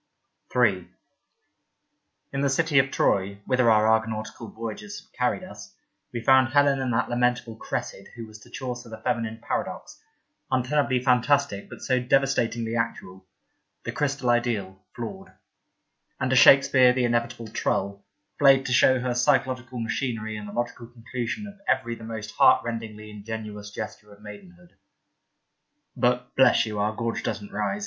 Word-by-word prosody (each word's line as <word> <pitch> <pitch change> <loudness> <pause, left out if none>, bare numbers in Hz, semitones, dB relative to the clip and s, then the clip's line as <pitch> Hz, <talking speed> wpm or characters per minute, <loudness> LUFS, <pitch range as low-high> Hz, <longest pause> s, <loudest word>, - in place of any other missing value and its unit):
Beauty 125 -4 +4
47 95 -1 -8
III - - -19 1.4
IN 140 - -1
the 140 - +2
city 145 +1 +3
of 135 0 +2
Troy, 100 -5 +1
whither 130 -2 +3
our 110 -1 +4
Argonautical 110 0 -1
voyages 110 -2 -7
had - - -32
carried - - 0
us, - - -11 0.4
we 120 - -4
found 130 +1 +5
Helen 145 -1 +4
and 130 -2 -1
that 115 +2 +1
lamentable 120 -1 0
Cressid - - -5
who 115 - -7
was 110 -1 -13
to - - -17
Chaucer 125 -2 -6
the 110 - -8
feminine 115 0 -2
paradox, - - -4 0.5
untenably 130 0 +1
fantastic 125 -3 +2
but - - -11
so 130 -1 +1
devastatingly 125 -3 +1
actual, 95 -5 -4 0.6
the - - -4
crystal 140 -4 0
ideal 105 -6 -1
— - - -44
flawed; 190 +11 -7 0.9
and 130 0 -1
to - - +3
Shakespeare 130 -1 +7
the 125 -1 +1
inevitable 120 -1 -1
trull, 100 -1 -2 0.4
flayed 135 -1 +5
to 125 - -1
show 130 +1 +5
her 125 0 -1
physiological 130 -1 0
machinery 115 -2 -3
and 105 -1 -7
the - - -10
logical 120 0 -4
conclusion 120 - -5
of 200 -1 -11
every 130 -3 +1
the 115 - -10
most 110 -1 -6
heartrendingly 110 -2 +2
ingenuous 105 -1 -7
gesture 105 0 -8
of 100 - -16
maidenhood. 90 -4 -13 1.2
(But, 125 0 0
bless 130 -2 +5
you! 105 -2 -4
our 105 +1 +1
gorge 115 0 -2
doesn't 105 -1 -5
rise. 105 - -2
120 Hz, 155 wpm, -25 LUFS, 110-130 Hz, 1.4 s, Shakespeare